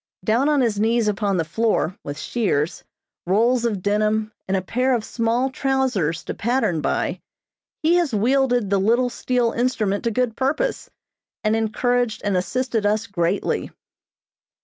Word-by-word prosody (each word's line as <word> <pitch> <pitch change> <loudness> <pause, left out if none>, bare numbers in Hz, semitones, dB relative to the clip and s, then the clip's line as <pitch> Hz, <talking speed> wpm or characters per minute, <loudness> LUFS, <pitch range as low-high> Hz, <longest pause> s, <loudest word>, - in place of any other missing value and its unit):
Down 235 +9 +2
on 295 -2 +3
his 225 -4 +1
knees 225 +1 +2
upon 205 -2 0
the 165 - 0
floor, 190 0 0
with 145 0 -6
shears, 175 -10 -1 0.4
rolls 235 +6 +2
of 205 -6 -1
denim, 215 +1 +1 0.2
and 190 0 +1
a - - -1
pair 250 +6 +1
of 225 - -3
small 240 +3 0
trousers 255 - 0
to - - -4
pattern 230 -8 0
by, - - -1 0.6
he 320 +2 +4
has 340 -5 +1
wielded 245 -1 +2
the 200 - +3
little 240 +5 +2
steel 245 -2 0
instrument 230 -5 0
to - - +3
good 230 0 -1
purpose, 295 - -1 0.5
and 215 0 +2
encouraged 230 +1 0
and 200 -2 0
assisted 230 +4 -1
us 210 +2 +1
greatly. 180 -2 -1
225 Hz, 150 wpm, -22 LUFS, 205-250 Hz, 0.6 s, he